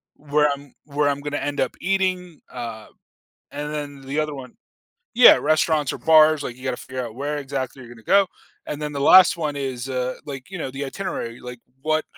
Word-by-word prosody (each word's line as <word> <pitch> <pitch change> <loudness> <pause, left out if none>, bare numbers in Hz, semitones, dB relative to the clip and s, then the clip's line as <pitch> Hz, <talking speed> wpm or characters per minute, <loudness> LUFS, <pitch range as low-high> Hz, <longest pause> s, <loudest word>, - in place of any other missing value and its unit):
where 150 0 +1
I'm 140 -1 -11
where 145 0 0
I'm 140 0 -2
gonna 145 0 -3
end 145 - -7
up - - -1
eating, 185 -3 -1
uh, 115 -3 -7 0.6
and 150 +1 -5
then 145 -2 -6
the 150 - -1
other 150 -1 -2
one 130 +3 -10 0.6
Yeah, 245 +1 +9
restaurants 155 -1 +1
or - - -6
bars, 155 -2 +5
like, 120 - -5
you 130 - -15
gotta 130 -2 -1
figure 130 -1 -4
out 110 - -10
where 145 +2 -3
exactly 135 -1 -4
you're 120 0 -12
gonna 115 - -16
go, 200 -1 +5 0.4
and 150 - -5
then 150 0 -4
the 140 - -4
last 185 -2 +8
one 150 -3 -3
is, 130 -2 -4
uh, 130 -1 -2
like, 135 0 -7
you 185 - -6
know, 135 - -4
the 135 +2 -5
itinerary, 135 -7 -5
like, 125 0 -9 0.2
what 155 0 +1
145 Hz, 205 wpm, -23 LUFS, 130-155 Hz, 0.6 s, Yeah